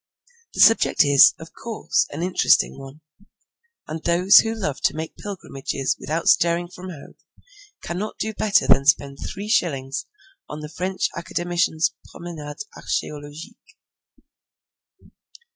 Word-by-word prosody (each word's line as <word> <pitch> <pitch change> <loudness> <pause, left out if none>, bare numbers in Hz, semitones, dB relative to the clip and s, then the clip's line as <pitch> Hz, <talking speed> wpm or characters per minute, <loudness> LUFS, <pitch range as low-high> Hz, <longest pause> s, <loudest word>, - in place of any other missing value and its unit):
The - - +1
subject 225 - +5
is, 140 -1 +7
of 160 0 -12
course, 225 -1 -1
a 145 - -7
most 165 - -3
interesting 185 -5 +2
one, 135 +3 -12 0.9
and 155 +1 -6
those 180 +4 +5
who 225 0 +4
love 170 -11 -4
to - - +2
make 160 +1 -6
pilgrimages 140 -9 -4
without 165 +2 -3
stirring 170 0 +3
from 185 +1 -10
home 155 -6 -12 0.7
cannot 190 +5 -5
do 220 0 -3
better 210 -1 +2
than 140 - +4
spend 140 -1 +2
three 200 +2 -6
shillings 135 -10 -1 0.4
on 150 +1 -7
the 150 - -7
French 185 +1 -1
Academician's 170 -2 -1 0.2
Promenades 160 +1 -8
Archeologiques. 150 +8 -6
170 Hz, 125 wpm, -22 LUFS, 145-185 Hz, 0.9 s, is